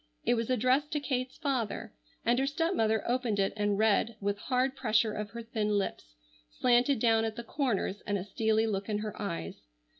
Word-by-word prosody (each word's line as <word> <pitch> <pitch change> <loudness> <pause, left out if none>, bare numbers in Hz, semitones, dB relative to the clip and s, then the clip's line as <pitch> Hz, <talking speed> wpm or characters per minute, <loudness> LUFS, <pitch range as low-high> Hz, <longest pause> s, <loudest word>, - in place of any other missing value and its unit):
It - - +4
was 230 0 -1
addressed 255 +4 +2
to 300 - +1
Kate's 255 -3 -2
father, 265 -9 -2 0.3
and 240 +2 +3
her 270 - +1
stepmother 275 - +1
opened 240 -3 0
it 195 - +1
and 205 -1 +1
read 220 +1 +2
with 205 0 -1
hard 260 +2 0
pressure 220 -4 +2
of 210 0 -4
her 235 +2 -7
thin 220 -2 -2
lips, - - -4 0.3
slanted 245 - +3
down 225 0 +3
at 220 -1 -2
the 235 - -6
corners, 230 -7 -1
and 205 - +1
a 185 - -4
steely 220 +2 +1
look 205 -1 -2
in 210 - 0
her 215 - -6
eyes. 165 - -5
225 Hz, 190 wpm, -30 LUFS, 210-255 Hz, 0.3 s, It